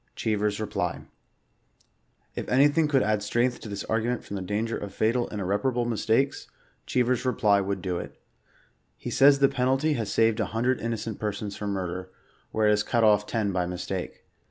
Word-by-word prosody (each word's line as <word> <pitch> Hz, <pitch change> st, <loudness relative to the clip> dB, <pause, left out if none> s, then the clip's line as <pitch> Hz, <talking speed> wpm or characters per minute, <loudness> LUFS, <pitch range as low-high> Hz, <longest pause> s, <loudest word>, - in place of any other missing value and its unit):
CREEVER^S 105 Hz, -1 st, 0 dB
REPtY. 110 Hz, -, -3 dB, 1.3 s
If -, -, -5 dB
anything 145 Hz, +4 st, +4 dB
could 140 Hz, -3 st, +3 dB
add 105 Hz, 0 st, +1 dB
strength 120 Hz, +4 st, 0 dB
to 110 Hz, -, -9 dB
this 100 Hz, -1 st, -4 dB
argument 115 Hz, +2 st, -1 dB
frdmthe 95 Hz, -2 st, -6 dB
danger 110 Hz, +3 st, -1 dB
of 100 Hz, -1 st, -6 dB
fatal 120 Hz, +2 st, +1 dB
and 105 Hz, -, -5 dB
irreparable 105 Hz, +6 st, 0 dB
mistakes, 120 Hz, +3 st, 0 dB, 0.4 s
Cheever's 125 Hz, -1 st, +1 dB
reply 105 Hz, -5 st, +3 dB
would 95 Hz, -1 st, -3 dB
do 90 Hz, -2 st, -1 dB
it. -, -, -9 dB, 0.8 s
He -, -, -6 dB
says 140 Hz, +1 st, +6 dB
the 140 Hz, 0 st, +5 dB
penalty 135 Hz, +4 st, +1 dB
has 110 Hz, -7 st, -3 dB
saved 115 Hz, 0 st, +2 dB
a 110 Hz, -, +1 dB
hundred 125 Hz, +2 st, +1 dB
innocent 115 Hz, -2 st, -3 dB
persons 105 Hz, -1 st, -3 dB
from 105 Hz, -, -4 dB
murder, 95 Hz, -1 st, -4 dB, 0.4 s
where 110 Hz, 0 st, 0 dB
it 105 Hz, -, +5 dB
has 105 Hz, 0 st, +3 dB
cut 115 Hz, +2 st, +1 dB
off 105 Hz, -1 st, +4 dB
ten 110 Hz, -4 st, -1 dB
by 90 Hz, -2 st, -1 dB
mistake. 90 Hz, +1 st, -5 dB
110 Hz, 175 wpm, -26 LUFS, 100-125 Hz, 1.3 s, says